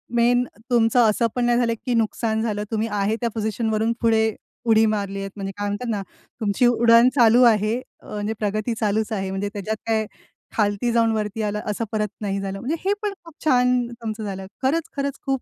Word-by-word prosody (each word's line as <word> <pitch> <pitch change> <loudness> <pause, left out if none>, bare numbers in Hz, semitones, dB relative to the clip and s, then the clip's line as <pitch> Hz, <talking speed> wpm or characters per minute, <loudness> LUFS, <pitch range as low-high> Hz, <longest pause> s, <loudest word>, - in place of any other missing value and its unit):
Main 245 +1 +4 0.3
तुमचं 235 0 +3
असं 230 +2 +2
पण 245 -1 +1
नाही 240 0 +3
झालं 235 -2 +2
की 250 - 0
नुकसान 220 0 0
झालं. 210 -2 -1
तुम्ही 220 +1 0
आहे 205 +1 0
त्या 235 - +1
पोझिशनवरून 220 +1 0
पुढे, 220 -1 +2 0.3
उडी 225 -1 +5
मारलीयेत 195 -2 -2
म्हणजे 195 -1 -4
काय 205 0 -2
म्हणतात 205 +4 -3
ना 205 -3 -1 0.4
तुमची 210 +3 +2
उडण 235 0 +6
चालू 240 0 +6
आहे 215 +2 0 0.3
अ, - - -20
म्हणजे 210 +1 -2
प्रगती 215 +2 -1
चालूच 220 +1 0
आहे 190 -2 -2
म्हणजे 200 +1 -2
त्याच्यात 210 +2 -3
काय 220 -1 +1 0.5
खालती 210 +3 +1
जाऊन 230 -1 +3
वरती 215 +1 -2
आलं 210 0 -2
असं 225 +2 -2
परत 210 -1 0
नाही 200 -1 -1
झालं. 195 0 -4
म्हणजे 290 +7 -2
हे 400 - +3
पण 415 -1 -2
खूप 335 -2 -14
छान 250 -3 +3
तुमचं 225 -2 -6
झालं. 195 -2 -5 0.2
खरंच-खरंच 280 -1 -1
खूप 270 -1 0
220 Hz, 190 wpm, -23 LUFS, 210-240 Hz, 0.5 s, उडण